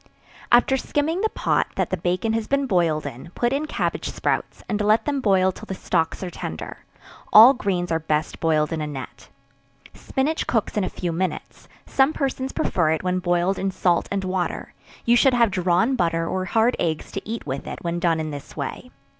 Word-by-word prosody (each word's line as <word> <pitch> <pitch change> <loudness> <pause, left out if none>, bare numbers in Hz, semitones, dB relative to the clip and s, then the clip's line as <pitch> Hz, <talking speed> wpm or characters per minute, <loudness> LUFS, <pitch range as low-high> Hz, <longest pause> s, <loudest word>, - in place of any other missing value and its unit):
After 245 +2 +5
skimming 310 +7 -1
the 440 - +1
pot - - 0
that - - -1
the - - +2
bacon 180 +6 -1
has 225 -1 -1
been 280 0 +1
boiled 170 -8 +1
in, 125 +7 -7
put 240 +1 +1
in 295 +3 -1
cabbage - - -2
sprouts, - - -2
and 210 -1 -1
let 210 +2 +3
them 285 -2 -1
boil 190 -4 +3
till - - -12
the 190 - -4
stalks 165 -1 -1
are 180 - -4
tender; 80 - -7 0.5
all 230 +5 +10
greens 185 -8 -2
are 165 - +1
best 155 0 -2
boiled 155 -1 +1
in 160 - -2
a 150 - -2
net. 135 -3 -8 0.6
Spinach 295 +4 -2
cooks 225 -3 0
in 210 - +1
a 185 - -1
few 175 -2 -3
minutes; 180 +3 -4 0.2
some 270 +3 +2
persons 270 -2 -2
prefer 165 -4 0
it 160 +2 0
when 185 0 0
boiled 175 +1 +1
in 195 - 0
salt 180 -2 +1
and 200 -1 -2
water; 185 -1 -3 0.3
you 235 - +5
should 255 +1 +4
have 235 -3 +3
drawn 185 +6 +2
butter 165 -5 0
or 185 +1 -2
hard 225 +6 +2
eggs 160 -2 -2
to 195 - -6
eat 230 +1 -4
with 135 -1 -4
it - - -5
when 170 0 -2
done 170 -2 +1
in 155 -1 -3
this 145 -1 -9
way. - - -5
185 Hz, 205 wpm, -23 LUFS, 170-235 Hz, 0.6 s, all